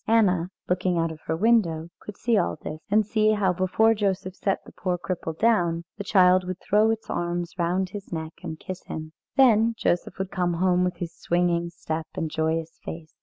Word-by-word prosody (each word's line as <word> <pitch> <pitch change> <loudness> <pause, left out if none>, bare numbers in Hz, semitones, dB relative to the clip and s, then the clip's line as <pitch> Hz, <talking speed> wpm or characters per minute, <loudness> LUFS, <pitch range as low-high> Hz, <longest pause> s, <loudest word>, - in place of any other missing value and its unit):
Anna, 185 -6 +3 0.2
looking 180 0 +1
out 165 -1 +1
of 160 - -9
her 160 - 0
window, 170 -6 +2
could 210 - -10
see 235 -1 +1
all 195 - +1
this; 155 +1 -7
and 210 +1 +4
see 215 +1 +3
how 195 -3 +2
before 185 +5 +3
Joseph 195 -3 -1
set 195 0 -1
the - - -12
poor 180 -1 -2
cripple 170 -3 -4
down, 175 -7 +2 0.2
the - - -2
child 185 -2 +5
would 185 0 -4
throw 210 +2 +3
its 225 0 -2
arms 175 0 -2
round 180 +2 +1
his 200 -1 -8
neck 160 -1 -4
and 160 -3 -6
kiss 185 -1 -6
him. 155 0 -6 0.2
Then 230 -3 +5
Joseph 175 - 0
would 190 0 -3
come 180 -1 0
home 180 +1 +2
with 180 -1 0
his 170 -1 -6
swinging 175 0 0
step 160 -2 -4
and 160 -1 -2
joyous 160 +1 -1
face. 160 -1 -8
180 Hz, 200 wpm, -25 LUFS, 170-205 Hz, 0.2 s, child